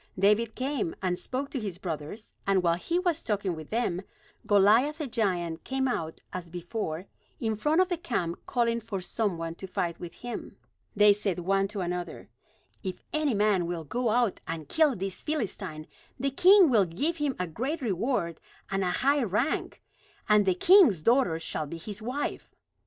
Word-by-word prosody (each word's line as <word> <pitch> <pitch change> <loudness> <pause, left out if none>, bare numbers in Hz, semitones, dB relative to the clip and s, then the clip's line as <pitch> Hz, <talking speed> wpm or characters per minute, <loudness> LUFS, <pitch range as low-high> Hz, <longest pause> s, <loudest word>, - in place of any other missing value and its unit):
David 210 +4 +3
came, 260 - -2
and 180 -1 0
spoke 270 +2 -4
to 270 - -2
his 200 -6 -4
brothers; 175 +4 -6
and 195 -2 +3
while 170 -1 +4
he 260 - -1
was 350 -3 +1
talking 200 -3 -1
with 155 -1 -9
them, 215 -6 0 0.5
Goliath 215 +9 +5
the 310 - -3
giant 185 -9 -1
came 265 0 -1
out 160 -10 -3
as 180 -2 -5
before 175 0 -4 0.3
in 220 -1 0
front 300 - +2
of 370 - +3
the 355 - 0
camp 180 - -2
calling 235 -1 +1
for 210 -3 -4
some 200 0 -2
one 165 0 -4
to 190 +3 -8
fight 170 -2 -2
with 175 -1 -8
him. 245 -1 -7 0.4
They 210 0 +7
said 200 -3 -2
one 195 +2 +1
to 200 -1 -5
another: 180 0 -4 0.5
"If 185 -2 -5
any 305 -6 +1
man 200 -4 +2
will 170 -2 -3
go 240 - -1
out 235 -2 +1
and 160 -3 -5
kill 305 - +3
this 190 -1 -4
Philistine, 205 - -3 0.3
the 275 +2 0
king 365 +2 +7
will 210 -5 +5
give 285 - -1
him 290 -4 -1
a 180 - -1
great 255 - -3
reward 195 - -1 0.3
and 195 0 0
a 180 - +1
high 280 +9 +2
rank; 230 - -1 0.5
and 210 -2 +4
the 185 - +4
king's 260 - +6
daughter 235 - +3
shall 155 -2 -3
be 170 - -6
his 205 +5 -7
wife." 255 +6 -3
205 Hz, 180 wpm, -28 LUFS, 175-255 Hz, 0.5 s, They